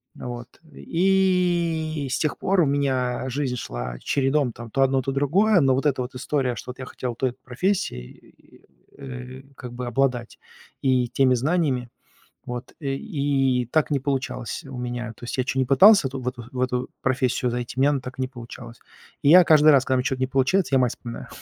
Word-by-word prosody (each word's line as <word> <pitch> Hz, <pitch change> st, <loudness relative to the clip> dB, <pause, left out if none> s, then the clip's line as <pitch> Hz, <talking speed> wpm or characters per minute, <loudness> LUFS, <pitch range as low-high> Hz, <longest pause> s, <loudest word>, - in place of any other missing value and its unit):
Вот. 120 Hz, -1 st, -7 dB, 0.3 s
И 175 Hz, -5 st, +1 dB
с -, -, 0 dB
тех 155 Hz, -, -1 dB
пор 190 Hz, -1 st, +2 dB
у -, -, +4 dB
меня 130 Hz, -2 st, 0 dB
жизнь 130 Hz, -1 st, -2 dB
шла -, -, -5 dB
чередом, 135 Hz, -1 st, +1 dB
там, 115 Hz, -1 st, -10 dB
то 135 Hz, -, 0 dB
одно, 135 Hz, 0 st, +2 dB
то 135 Hz, -, -3 dB
другое. 180 Hz, +8 st, +3 dB
Но 135 Hz, -1 st, +3 dB
вот 135 Hz, +3 st, -2 dB
эта 135 Hz, -3 st, +1 dB
вот 125 Hz, +1 st, -6 dB
история, 130 Hz, -2 st, -1 dB
что 125 Hz, -, -7 dB
вот 130 Hz, -, -15 dB
я 130 Hz, -, -5 dB
хотел 125 Hz, -2 st, -5 dB
той 130 Hz, 0 st, 0 dB
профессией, 130 Hz, -, -2 dB
и -, -, -23 dB, 0.3 s
и, -, -, -24 dB
э, 130 Hz, 0 st, -8 dB
как 125 Hz, -1 st, -9 dB
бы 125 Hz, 0 st, -5 dB
обладать 125 Hz, -1 st, -1 dB, 0.4 s
и 130 Hz, -2 st, +2 dB
теми 130 Hz, 0 st, +3 dB
знаниями, 135 Hz, -3 st, 0 dB, 0.6 s
вот, 125 Hz, 0 st, -7 dB
э, 135 Hz, -2 st, -2 dB
и 135 Hz, -, 0 dB
так 155 Hz, -1 st, +2 dB
не 140 Hz, -, +2 dB
получалось 130 Hz, -, -3 dB
у 125 Hz, -, -8 dB
меня. 120 Hz, -2 st, -4 dB
То 120 Hz, -, -11 dB
есть 120 Hz, -, -4 dB
я -, -, +3 dB
чё 130 Hz, -, -2 dB
ни -, -, +2 dB
пытался 155 Hz, -, +6 dB
ту 130 Hz, 0 st, -6 dB
в 125 Hz, -, -2 dB
эту 120 Hz, -2 st, -6 dB
в 125 Hz, -, -4 dB
эту 125 Hz, 0 st, -1 dB
профессию 130 Hz, -1 st, 0 dB
зайти, 120 Hz, 0 st, -4 dB
у -, -, +1 dB
меня 145 Hz, +2 st, +5 dB
она 140 Hz, -, 0 dB
так 125 Hz, +1 st, -9 dB
и -, -, -1 dB
не 130 Hz, -, -1 dB
получалась. 120 Hz, -1 st, -11 dB, 0.4 s
И -, -, +3 dB
я 180 Hz, +2 st, +9 dB
каждый 155 Hz, -1 st, +6 dB
раз, 135 Hz, -1 st, +4 dB
когда 130 Hz, -, +1 dB
у -, -, +1 dB
меня 125 Hz, -, -1 dB
чё-то 130 Hz, -1 st, -2 dB
не 130 Hz, -, 0 dB
получается, 135 Hz, +3 st, +1 dB
я -, -, +4 dB
мать 125 Hz, -1 st, +2 dB
вспоминаю 120 Hz, -1 st, -8 dB
130 Hz, 215 wpm, -24 LUFS, 125-145 Hz, 0.6 s, я